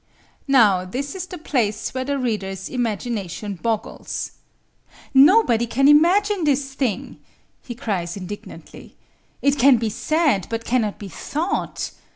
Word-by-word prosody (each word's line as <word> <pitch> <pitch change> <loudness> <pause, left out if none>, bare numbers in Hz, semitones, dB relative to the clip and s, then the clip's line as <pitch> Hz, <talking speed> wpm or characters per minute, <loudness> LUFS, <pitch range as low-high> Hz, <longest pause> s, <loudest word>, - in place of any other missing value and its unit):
Now 215 -9 +5
this 260 +10 -4
is 370 -1 -5
the 360 - -8
place 230 -9 -1
where 260 0 -2
the 280 +1 -2
reader's 195 -7 -3
imagination 215 -5 -3
boggles. 225 -2 -3 0.8
"Nobody 270 - +5
can 275 +4 +2
imagine 365 +6 +4
this 275 -2 0
thing," 255 -7 -3 0.4
he 240 - -8
cries 200 -8 -3
indignantly. 200 +2 -10 0.5
"It 280 0 +2
can 265 0 +6
be 225 -1 -2
said, 300 - +1
but 230 0 -4
cannot 230 -4 0
be 205 - -8
thought. 310 - -3
245 Hz, 130 wpm, -22 LUFS, 210-285 Hz, 0.8 s, can